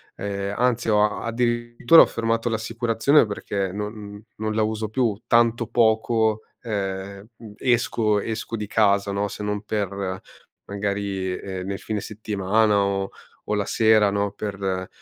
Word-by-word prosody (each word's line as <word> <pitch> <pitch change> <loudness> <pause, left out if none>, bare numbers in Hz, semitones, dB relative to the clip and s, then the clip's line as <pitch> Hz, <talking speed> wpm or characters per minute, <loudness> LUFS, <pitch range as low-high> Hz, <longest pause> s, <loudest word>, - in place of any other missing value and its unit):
ehm, 100 0 -3
anzi 125 -1 +1
ho 105 0 +2
addirittura 120 +4 +4
ho - - +3
fermato 115 +1 -1
l'assicurazione 115 +4 +2
perché 100 -2 -3
non 105 0 -6
non 110 0 -2
la 110 - +1
uso 110 0 -2
più 110 -2 -1
tanto 115 -1 +3
poco, 110 -1 +2 0.2
ehm, 100 -2 -4 0.3
esco 115 -4 +1
esco 115 +1 -4
di 105 -1 -4
casa 100 -2 +2
no, 100 +1 -1
se 105 - -7
non 105 0 -2
per 100 -3 -3 0.5
magari, 100 -2 -2
ehm, 95 -1 -6
nel 100 0 -4
fine 110 -2 -3
settimana 105 0 0
o 95 0 -1 0.4
o - - +2
la 100 - 0
sera 110 -2 +4
no, 100 0 0
per, 100 -3 -3
105 Hz, 140 wpm, -23 LUFS, 100-115 Hz, 0.5 s, addirittura